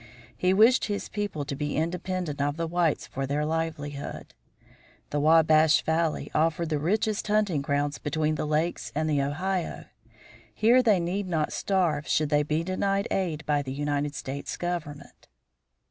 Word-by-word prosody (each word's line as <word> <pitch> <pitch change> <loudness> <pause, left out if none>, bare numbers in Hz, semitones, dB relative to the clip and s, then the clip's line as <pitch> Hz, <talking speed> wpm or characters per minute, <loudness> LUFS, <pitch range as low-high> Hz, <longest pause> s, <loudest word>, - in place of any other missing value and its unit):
He 180 - +1
wished 225 +6 +5
his 205 -1 -3
people 205 -9 -3
to 140 - -4
be 150 +1 -3
independent 175 -2 -2
of 145 +1 0
the 165 - -1
whites 165 -2 0
for 135 0 -4
their 145 +2 0
livelihood. 155 -3 -4 0.8
The 145 - 0
Wabash 155 0 +5
Valley 160 -1 0
offered 165 +1 +1
the 150 -2 0
richest 210 +7 0
hunting 205 -8 +1
grounds 145 +1 -1
between 155 +1 0
the 155 - -2
Lakes 155 +3 -1
and 155 +1 0
the 145 -2 +1
Ohio. 175 +6 -2 0.7
Here 235 +4 +5
they 215 -6 +3
need 185 +3 -2
not 160 -4 -1
starve 170 -7 0
should 155 -1 +1
they 145 0 +3
be 150 +2 -1
denied 195 +2 -1
aid 165 -5 -1
by 145 -1 +1
the 130 -2 -5
United 145 0 -2
States 140 +1 -5
government. 165 -5 -5
160 Hz, 160 wpm, -27 LUFS, 145-180 Hz, 0.8 s, wished